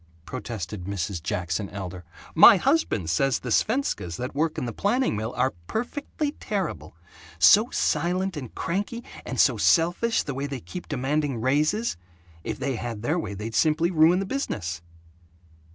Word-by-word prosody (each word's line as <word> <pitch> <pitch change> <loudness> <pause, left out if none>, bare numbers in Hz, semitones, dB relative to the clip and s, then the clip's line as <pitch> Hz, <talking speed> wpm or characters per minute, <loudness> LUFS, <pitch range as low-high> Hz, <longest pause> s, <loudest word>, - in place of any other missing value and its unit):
protested 105 -6 -6
Mrs. 95 -2 -3
Jackson 85 +3 -2
Elder. 90 -3 -7 0.3
"My 195 +5 +9
husband 265 - +1
says 135 +10 +2
the 125 - -6
Svenskas 215 - 0
that 125 +1 -4
work 155 +3 0
in 140 - -2
the 120 - -4
planing 225 - +1
mill 110 +2 -3
are 125 0 +1
perfectly 290 +5 -3
terrible 155 - -4 0.4
so 210 - +6
silent 185 -2 0
and 130 -6 -7
cranky, 205 +7 -3 0.2
and - - -4
so - - +4
selfish, 175 +7 +2
the 140 - -4
way 135 +2 -3
they 140 -2 -5
keep 180 - -8
demanding 140 -1 -1
raises. 150 - +1 0.5
If - - -4
they 135 -1 -2
had 115 -2 -5
their 155 +8 +1
way 105 -11 -5
they'd 110 +3 -6
simply 160 +6 +2
ruin 165 +1 +5
the 195 - -1
business." 95 - -3
140 Hz, 155 wpm, -25 LUFS, -, 0.5 s, My